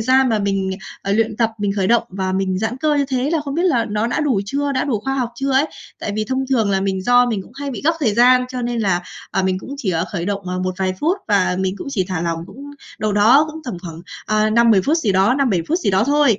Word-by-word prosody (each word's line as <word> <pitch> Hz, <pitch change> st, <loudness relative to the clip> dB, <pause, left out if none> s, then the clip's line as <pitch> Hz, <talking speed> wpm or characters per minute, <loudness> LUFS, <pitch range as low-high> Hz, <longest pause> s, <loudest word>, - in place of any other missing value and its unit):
gian 260 Hz, +3 st, +3 dB
mà 225 Hz, -2 st, +1 dB
mình, 195 Hz, -1 st, -1 dB, 0.3 s
ờ, 200 Hz, -, -1 dB
luyện 220 Hz, 0 st, +1 dB
tập 230 Hz, -1 st, +1 dB
mình 205 Hz, -1 st, 0 dB
khởi 195 Hz, -2 st, +1 dB
động 235 Hz, +3 st, +4 dB
và 190 Hz, 0 st, -3 dB
mình 190 Hz, -1 st, 0 dB
giãn 220 Hz, +4 st, -2 dB
cơ 300 Hz, +3 st, +1 dB
như 285 Hz, -1 st, +2 dB
thế 265 Hz, +1 st, -1 dB
là 325 Hz, -2 st, +1 dB
không 280 Hz, -2 st, -5 dB
biết 340 Hz, -, 0 dB
là 270 Hz, -11 st, +2 dB
nó 210 Hz, +2 st, 0 dB
đã 240 Hz, -, -1 dB
đủ 270 Hz, -9 st, +1 dB
chưa? 280 Hz, +5 st, -1 dB
Đã 260 Hz, -, 0 dB
đủ 235 Hz, -7 st, -1 dB
khoa 270 Hz, +5 st, -2 dB
học 255 Hz, -3 st, -1 dB
chưa 270 Hz, +3 st, -2 dB
ấy? 270 Hz, +3 st, +3 dB, 0.3 s
Tại 205 Hz, -, -3 dB
vì 215 Hz, -, 0 dB
thông 260 Hz, +4 st, -1 dB
thường 225 Hz, -6 st, +2 dB
là 195 Hz, -1 st, +1 dB
mình 190 Hz, -1 st, -1 dB
do 245 Hz, +3 st, +4 dB
mình 220 Hz, -5 st, -2 dB
cũng 200 Hz, -, -17 dB
hay 280 Hz, +1 st, -5 dB
bị 250 Hz, -, -5 dB
gấp 325 Hz, -, +4 dB
thời 225 Hz, -8 st, +1 dB
gian 250 Hz, +2 st, +5 dB
cho 255 Hz, -1 st, -4 dB
nên 240 Hz, -1 st, -1 dB
là, 190 Hz, -4 st, +1 dB, 0.3 s
ờ, 195 Hz, -, 0 dB
mình 185 Hz, 0 st, 0 dB
cũng 265 Hz, +8 st, -8 dB
chỉ 235 Hz, -9 st, -2 dB
ở 165 Hz, -1 st, 0 dB
khởi 170 Hz, -3 st, -2 dB
động, 200 Hz, 0 st, -2 dB
ờ, 180 Hz, 0 st, -2 dB
một 185 Hz, 0 st, -2 dB
vài 190 Hz, -1 st, 0 dB
phút 340 Hz, +6 st, +2 dB
và 190 Hz, -3 st, +2 dB
mình 190 Hz, 0 st, -1 dB
cũng -, -, -7 dB
chỉ 195 Hz, -9 st, 0 dB
thả 180 Hz, -3 st, -2 dB
lỏng 165 Hz, -1 st, -2 dB
cũng 280 Hz, +7 st, -11 dB, 0.3 s
đầu 215 Hz, -1 st, -1 dB
đó 235 Hz, +9 st, +5 dB
cũng 320 Hz, -, -8 dB
tầm 245 Hz, -, -4 dB
khoảng, 165 Hz, -3 st, -8 dB, 0.3 s
ờ, 215 Hz, 0 st, +2 dB
5-10 225 Hz, -3 st, +4 dB
phút 305 Hz, -, +2 dB
gì 210 Hz, -11 st, +1 dB
đó, 195 Hz, +6 st, +3 dB
5-7 255 Hz, -10 st, +1 dB
phút 335 Hz, -, +1 dB
gì 360 Hz, -, 0 dB
đó 190 Hz, +3 st, +3 dB
thôi 285 Hz, -5 st, +3 dB
225 Hz, 290 wpm, -19 LUFS, 195-265 Hz, 0.3 s, gian